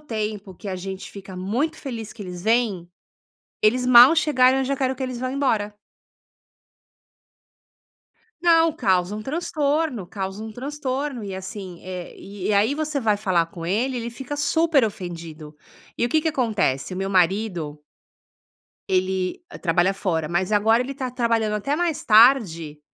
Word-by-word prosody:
tempo 215 Hz, -7 st, -5 dB
que 200 Hz, -, -9 dB
a 185 Hz, -, -3 dB
gente 190 Hz, +1 st, -7 dB
fica 195 Hz, -2 st, -10 dB
muito 240 Hz, -, -1 dB
feliz 230 Hz, -6 st, -6 dB
que 220 Hz, -, -9 dB
eles 180 Hz, -2 st, -7 dB
vêm, 220 Hz, -6 st, +1 dB, 0.7 s
eles 250 Hz, +4 st, +3 dB
mal 250 Hz, +5 st, +9 dB
chegaram 265 Hz, -5 st, +4 dB
eu 265 Hz, -, 0 dB
já 275 Hz, +1 st, -1 dB
quero 260 Hz, -1 st, 0 dB
que 270 Hz, -, -6 dB
eles 255 Hz, -2 st, -4 dB
vão 255 Hz, -, -2 dB
embora. 220 Hz, -7 st, 0 dB, 2.7 s
Não, 330 Hz, -1 st, +5 dB
causa 190 Hz, -6 st, +1 dB
um 215 Hz, -, -5 dB
transtorno, 295 Hz, -, -1 dB
causa 195 Hz, +2 st, -5 dB
um 220 Hz, -, -6 dB
transtorno. 270 Hz, +1 st, -4 dB
E 200 Hz, -2 st, -6 dB
assim, 190 Hz, -1 st, -7 dB
eh, 180 Hz, -1 st, -6 dB
e 200 Hz, -1 st, -6 dB
e -, -, +2 dB
aí 210 Hz, +7 st, +3 dB
você 305 Hz, -1 st, -2 dB
vai 215 Hz, -4 st, +2 dB
falar 185 Hz, -5 st, +1 dB
com 165 Hz, 0 st, -9 dB
ele, 235 Hz, +9 st, 0 dB
ele 235 Hz, 0 st, -4 dB
fica 270 Hz, +4 st, -6 dB
super 315 Hz, -2 st, +2 dB
ofendido. 165 Hz, -7 st, -7 dB, 0.4 s
E -, -, 0 dB
o -, -, +1 dB
que 310 Hz, +5 st, +2 dB
que 320 Hz, -, -5 dB
acontece, 215 Hz, -, 0 dB
o 185 Hz, -, -5 dB
meu 195 Hz, 0 st, -2 dB
marido 180 Hz, -4 st, 0 dB, 1.1 s
ele 185 Hz, -, 0 dB, 0.2 s
trabalha 175 Hz, +2 st, +2 dB
fora. 165 Hz, -6 st, -1 dB
Mas 180 Hz, +4 st, -1 dB
agora 225 Hz, +3 st, +4 dB
ele 275 Hz, +2 st, -6 dB
tá 260 Hz, -2 st, -4 dB
trabalhando 230 Hz, -3 st, 0 dB
até 275 Hz, +8 st, -1 dB
mais 340 Hz, -3 st, -1 dB
tarde 210 Hz, -, +4 dB
215 Hz, 160 wpm, -23 LUFS, 185-260 Hz, 2.7 s, mal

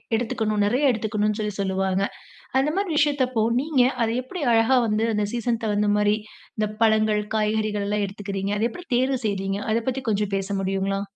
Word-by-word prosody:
எடுத்துக்கணும் 215 Hz, -2 st, 0 dB
நிறைய 260 Hz, +6 st, +3 dB
எடுத்துக்கணும்னு 215 Hz, -1 st, -1 dB
சொல்லி 210 Hz, -1 st, -2 dB
சொல்லுவாங்க. 190 Hz, 0 st, 0 dB, 0.5 s
அந்த 275 Hz, +3 st, +2 dB
மாரி 395 Hz, -1 st, -1 dB
விஷயத்தப்போ 260 Hz, -6 st, +2 dB, 0.2 s
நீங்க 290 Hz, -4 st, +1 dB, 0.2 s
அத 225 Hz, -, +1 dB
எப்படி 345 Hz, +7 st, -7 dB
அழகா 225 Hz, +3 st, +4 dB
வந்து 215 Hz, +1 st, +1 dB
அந்த 210 Hz, 0 st, +1 dB
சீசன் 235 Hz, -1 st, -1 dB
தகுந்தா 210 Hz, -1 st, +1 dB
மாரி, 210 Hz, 0 st, +3 dB, 0.4 s
இந்த 215 Hz, -1 st, +1 dB, 0.2 s
பழங்கள் 215 Hz, -1 st, +3 dB
காய்கறிகள்லாம் 210 Hz, -1 st, 0 dB
எடுத்துக்கிறீங்க? 200 Hz, 0 st, -4 dB
அத 220 Hz, -, +1 dB
எப்படி 355 Hz, +8 st, -10 dB
தேர்வு 260 Hz, +1 st, +1 dB
செய்கிறீங்க? 195 Hz, -1 st, -1 dB
அத 225 Hz, -, +2 dB
பற்றி 260 Hz, +1 st, -3 dB
கொஞ்சம் 205 Hz, -1 st, 0 dB
பேச 195 Hz, 0 st, -2 dB
முடியுங்களா? 195 Hz, +1 st, -1 dB
215 Hz, 160 wpm, -24 LUFS, 205-240 Hz, 0.5 s, அழகா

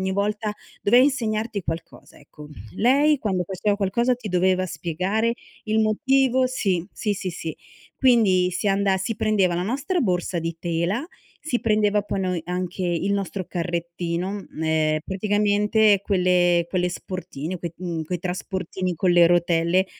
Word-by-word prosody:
ogni 190 Hz, 0 st, -1 dB
volta, 210 Hz, +1 st, -1 dB, 0.3 s
doveva 245 Hz, +5 st, +6 dB
insegnarti 225 Hz, -6 st, 0 dB
qualcosa, 160 Hz, 0 st, -7 dB
ecco. 150 Hz, +1 st, -14 dB, 0.3 s
Lei, 285 Hz, +5 st, +4 dB
quando 190 Hz, -6 st, -1 dB
faceva 200 Hz, +2 st, -1 dB
qualcosa, 235 Hz, +5 st, +1 dB
ti 235 Hz, -3 st, -8 dB
doveva 185 Hz, +1 st, +2 dB
spiegare 185 Hz, +8 st, -1 dB, 0.3 s
il 220 Hz, 0 st, +1 dB
motivo 260 Hz, +3 st, +2 dB
sì. 195 Hz, -9 st, -1 dB
Sì, 210 Hz, -2 st, -1 dB
sì, 185 Hz, -1 st, -4 dB
sì. 165 Hz, -2 st, -6 dB, 0.4 s
Quindi 205 Hz, -8 st, +4 dB
si 185 Hz, +3 st, -1 dB
anda 195 Hz, 0 st, +2 dB
si 215 Hz, +4 st, -3 dB
prendeva 195 Hz, -6 st, +2 dB
la 175 Hz, -, -1 dB
nostra 280 Hz, -, -1 dB
borsa 180 Hz, -, 0 dB
di 165 Hz, 0 st, -3 dB
tela, 175 Hz, -, -1 dB, 0.3 s
si 255 Hz, -6 st, -2 dB
prendeva 210 Hz, -2 st, +2 dB
poi, 195 Hz, -1 st, -3 dB
noi, 180 Hz, -3 st, -1 dB
anche 180 Hz, +1 st, -3 dB
il 175 Hz, +3 st, 0 dB
nostro 195 Hz, -1 st, -2 dB
carrettino, 175 Hz, +2 st, -3 dB
m 160 Hz, -, -7 dB
ehm, 155 Hz, -1 st, +1 dB
praticamente 205 Hz, +1 st, +2 dB
quelle 180 Hz, -3 st, +2 dB
quelle 180 Hz, 0 st, 0 dB
sportine, 180 Hz, -2 st, -5 dB
quei 170 Hz, -1 st, -5 dB
mhmm, 170 Hz, -3 st, -4 dB
quei 180 Hz, +3 st, -3 dB
trasportini 185 Hz, 0 st, -3 dB
con 180 Hz, +3 st, +1 dB
le 175 Hz, -1 st, +7 dB
rotelle 175 Hz, +1 st, +2 dB
190 Hz, 150 wpm, -23 LUFS, 175-215 Hz, 0.4 s, le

